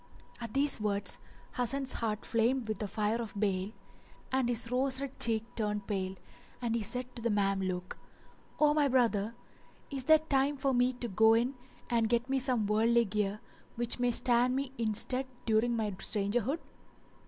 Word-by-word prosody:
At 230 -1 -7
these 275 -4 +3
words 205 -1 -1 0.4
Hasan's 265 +2 +1
heart 215 -2 -3
flamed 235 +1 +1
with 215 -2 -3
the 210 - -2
fire 215 +3 -1
of 210 -3 -6
bale, 195 -1 0 0.6
and 260 -2 +1
his 235 0 -1
rose 260 +1 +1
red 275 -1 -6
cheek 225 -2 +3
turned 210 -2 -2
pale, 190 -2 -3 0.4
and 235 -2 -2
he 230 - 0
said 250 +4 -2
to 235 - -5
the 235 - 0
"Mameluke, 195 -3 -1 0.6
"O 295 -1 +5
my 295 -1 +3
brother, 230 -4 +1 0.6
is 270 -2 -3
there 315 +2 +7
time 285 -2 0
for 270 0 0
me 250 +1 +2
to 245 -1 -5
go 220 +2 +4
in 240 +4 +1 0.3
and 230 -2 +1
get 240 +1 +1
me 270 0 +1
some 250 -4 +1
worldly 230 +3 +3
gear 210 0 -2 0.3
which 240 +1 -1
may 245 0 +2
stand 245 +1 +3
me 270 -1 -2
in 220 -2 0
stead 260 +5 0 0.2
during 230 +2 +2
my 220 -2 -1
strangerhood?" 210 - 0
235 Hz, 175 wpm, -31 LUFS, 210-255 Hz, 0.6 s, there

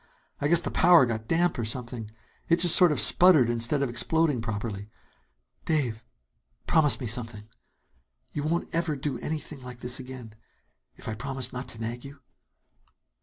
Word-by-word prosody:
I 145 - 0
guess 170 +2 +4
the - - -5
powder 175 -6 +6
got 110 -2 -4
damp 170 -1 +1
or - - -1
something. 115 -1 -5 0.4
It 170 - +5
just 175 -1 +4
sort 180 -3 +5
of 150 - +1
sputtered 155 -10 +5
instead 120 +5 0
of 135 - -1
exploding 150 +1 +1
properly. 105 -2 -5 0.7
Dave, 125 -8 -1 0.6
promise 155 -3 +4
me 130 - -5
something! 110 -2 -2 0.8
You 145 - -4
won't 165 +4 -2
ever 165 -2 -1
do 140 +1 -4
anything 150 -2 -5
like 125 -1 -11
this 125 +1 -2
again, 125 -4 -10 0.6
if - - -11
I 110 - -3
promise 130 +2 -3
not 125 +1 -6
to 110 - -8
nag 115 +2 -5
you?" 140 0 -11
130 Hz, 165 wpm, -26 LUFS, 115-155 Hz, 0.8 s, powder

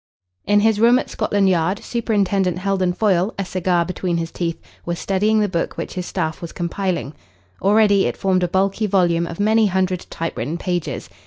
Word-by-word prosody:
In 205 0 +4
his 220 -1 +2
room 235 +2 +6
at - - -3
Scotland 200 -1 +1
Yard 185 +1 +1
Superintendent 200 -6 0
Heldon 190 -1 0
Foyle, 190 +1 +1
a 195 - -2
cigar 180 -2 0
between 180 -1 -2
his 165 -1 -3
teeth, 170 -2 -3 0.2
was 170 0 -3
studying 210 +4 +1
the 210 - +2
book 170 -3 -3
which - - -5
his 180 -1 -4
staff 160 -4 -3
was 170 - -6
compiling. 175 -3 -3 0.5
Already 205 0 +4
it - - -4
formed 190 -1 +1
a 180 - +1
bulky 195 +4 0
volume 175 -3 +2
of 170 - -8
many 215 +1 +3
hundred 185 -1 -1
typewritten 165 -2 -4
pages. 175 -2 -3
185 Hz, 180 wpm, -20 LUFS, 175-205 Hz, 0.5 s, room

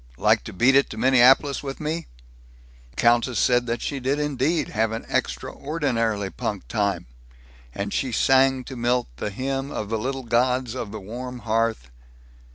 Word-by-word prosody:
Like - - +3
to - - -6
beat 120 +9 +3
it 140 - +4
to 110 - -8
Minneapolis 130 +3 +4
with 135 -1 -6
me?" 160 +2 -3 0.8
The - - -26
countess 120 0 +3
said 120 +1 +2
that 115 0 -2
she 140 - -3
did 135 +3 0
indeed 150 +2 0
have 110 +1 0
an 115 - -5
extraordinarily 115 -10 -2
punk 110 -5 -4
time, 100 -5 -1 0.7
and 100 +8 -4
she 130 - -1
sang 135 +1 +3
to 130 - -8
Milt 120 - 0
the 105 - -3
hymn 135 +5 -3
of 105 -6 -5
the 115 0 -1
little 135 +3 -3
gods 125 +1 +1
of 120 -5 -5
the 110 - -6
warm 125 +5 -7
hearth. 110 - 0
125 Hz, 165 wpm, -24 LUFS, 110-135 Hz, 0.8 s, it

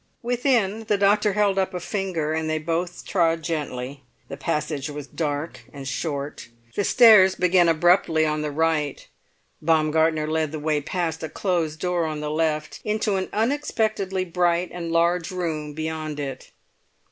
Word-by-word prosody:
Within 235 -4 +1
the 210 - +1
doctor 205 +1 +3
held 200 -1 +2
up 190 0 -1
a - - -2
finger 175 -5 -2
and 160 0 -1
they 155 - 0
both 165 +3 -3
trod 165 -3 +1
gently. 140 -4 -4 0.3
The - - -5
passage 150 0 -2
was 145 -1 -6
dark 150 0 -3
and 140 -2 -8
short. 140 +1 -4 0.3
The 205 - +1
stairs 210 -5 +7
began 180 -1 +4
abruptly 165 -1 +3
on 155 0 -1
the 150 - -2
right. 150 -1 -1 0.5
Baumgartner 160 0 +2
led 155 -1 -1
the 155 - -5
way 150 0 0
past 165 0 -3
a 160 - -4
closed 165 -4 -1
door 180 -2 0
on 155 -1 -4
the 150 0 -3
left, 155 -1 -1
into 210 -1 0
an 190 -1 -2
unexpectedly 220 -6 0
bright 175 0 +1
and 170 -1 -5
large 170 +1 +2
room 160 -5 -3
beyond 155 -1 -4
it. 135 -2 -6
165 Hz, 160 wpm, -24 LUFS, 155-185 Hz, 0.5 s, stairs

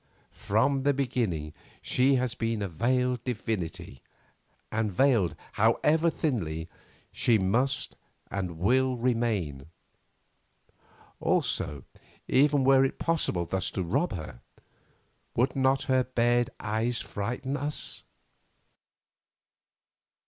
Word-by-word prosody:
From 130 +7 +1
the 140 +1 +2
beginning 110 - -1 0.3
she 135 +2 +2
has 125 -2 0
been 115 -3 -2
a - - -1
veiled 125 +7 0
divinity, 105 - -4 0.7
and 110 -1 0
veiled, 105 - +3 0.2
however 150 +9 +3
thinly, 85 - -2 0.4
she 115 - +3
must 120 +8 +1 0.4
and 90 -4 -3
will 130 +8 +2
remain. 110 - -1 1.5
Also, 75 -5 0 0.4
even 145 +1 +4
were 135 0 +6
it 135 - -1
possible 155 - 0
thus 95 +2 -1
to 95 - -3
rob 95 - 0
her, 80 -8 -7 0.9
would 125 +5 +1
not 135 0 +2
her 130 -2 +2
bared 120 -1 +1
eyes 110 +3 -1
frighten 125 +7 -3
us? 145 +1 -4
120 Hz, 100 wpm, -28 LUFS, 95-130 Hz, 1.5 s, were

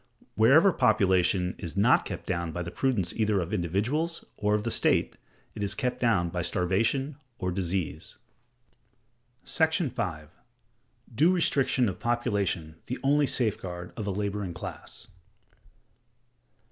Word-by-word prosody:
Wherever 140 - +5
population 95 - +2
is 85 0 -7
not 115 +6 +4
kept - - -6
down 85 -3 -2
by 90 +2 -4
the 85 - -6
prudence 115 -6 0
either 105 -3 +1
of 90 +3 -4
individuals 110 - -1
or 105 0 +1
of 105 - -1
the 115 - -1
state, - - +2 0.4
it - - -7
is 100 - -1
kept 125 -2 -2
down 105 -8 +2
by 90 +1 -3
starvation 115 - 0 0.2
or 90 -4 -2
disease. 90 -4 -3 1.3
§ 160 -2 +2
5. 90 - -4 0.8
Due 155 +10 +4
Restriction 140 -8 +2
of 95 - -4
Population 100 -9 -1
the 125 - -3
only 145 +1 +3
Safeguard 90 -8 -3
of 105 -3 -5
a - - 0
Laboring 100 -2 -3
Class. - - -8
105 Hz, 135 wpm, -28 LUFS, 90-125 Hz, 1.3 s, Wherever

